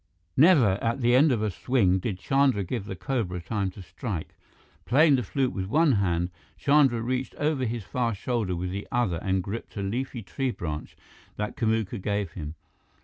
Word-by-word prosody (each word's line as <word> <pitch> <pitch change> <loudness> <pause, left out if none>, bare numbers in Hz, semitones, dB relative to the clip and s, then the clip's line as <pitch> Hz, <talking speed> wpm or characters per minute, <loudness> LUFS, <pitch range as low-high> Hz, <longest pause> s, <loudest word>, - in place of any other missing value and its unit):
Never, 130 - +5
at 115 +3 0
the 120 0 +3
end 140 +4 +6
of 110 -4 +1
a 105 - 0
swing, 95 -3 +2
did 95 0 -3
Chandra 135 -1 +2
give 100 +2 -4
the 95 - -5
cobra 95 -5 -2
time 100 +2 -2
to 95 +1 -11
strike. 95 - -5 0.5
Playing 145 +4 +5
the 130 - +1
flute 130 +4 -1
with 95 -1 -3
one 155 +7 +4
hand, 90 -5 +1 0.3
Chandra 140 -5 +4
reached 130 +2 -2
over 145 -3 0
his 115 -1 -3
far 115 +2 -1
shoulder 105 -3 -1
with 90 +1 -3
the 100 +2 -5
other 120 -8 +1
and 95 -1 0
gripped 105 +3 -6
a 100 - -2
leafy 120 +3 -3
tree 110 +9 -2
branch 75 -9 -5 0.4
that 105 0 -3
Kamuka 110 -3 0
gave 100 -3 -1
him. 80 -2 -7
110 Hz, 185 wpm, -27 LUFS, 95-130 Hz, 0.5 s, end